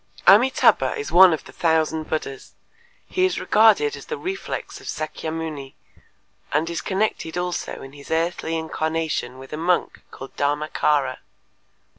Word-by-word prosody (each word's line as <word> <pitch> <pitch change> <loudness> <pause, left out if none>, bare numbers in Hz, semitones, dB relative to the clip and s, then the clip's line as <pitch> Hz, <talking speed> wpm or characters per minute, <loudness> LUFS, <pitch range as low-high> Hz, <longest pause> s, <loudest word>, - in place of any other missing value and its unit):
Amitâbha 250 - +5
is 430 -1 -5
one 185 0 +8
of 160 - -2
the - - -13
thousand 160 -1 0
Buddhas; 135 -4 -5 0.5
he 370 - -1
is 370 - +1
regarded 225 - +4
as - - -11
the 465 - -4
reflex 385 0 -5
of - - -12
Sakyamuni 155 -3 -5 0.8
and 155 +3 +1
is 170 - -3
connected 190 -4 -2
also 180 0 -3
in 135 0 -11
his 140 -1 -13
earthly 165 0 -1
incarnation 160 -5 -2
with 135 +2 -11
a - - -3
monk 175 +2 0
called 135 - -11
Dharmâkara. 145 -2 0
160 Hz, 140 wpm, -23 LUFS, 150-185 Hz, 0.8 s, one